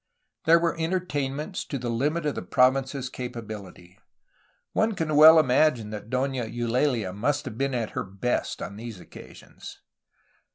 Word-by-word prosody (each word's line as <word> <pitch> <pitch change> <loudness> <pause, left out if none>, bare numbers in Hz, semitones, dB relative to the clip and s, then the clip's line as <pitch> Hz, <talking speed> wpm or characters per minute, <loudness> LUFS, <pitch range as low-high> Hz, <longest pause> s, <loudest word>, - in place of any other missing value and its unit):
There 165 +1 +7
were 170 0 0
entertainments 160 -2 -2
to 140 - -4
the 120 -2 -3
hmit 150 +7 -1
of 150 - 0
the - - -5
province's 130 +1 +1
capacity. 110 -8 -8 0.7
One 220 -1 +1
can 155 -3 -1
well 160 +2 +9
imagine 130 -5 +2
that 105 0 -7
Dona 130 -1 -1
Eulalia 120 -2 -1
must 140 +8 -1
have 110 - -6
been 135 +1 -1
at 115 -3 -2
her - - -3
best 100 +6 -3
on 100 - -7
these 115 -3 -8
occasions. - - -13
130 Hz, 150 wpm, -26 LUFS, 115-150 Hz, 0.7 s, well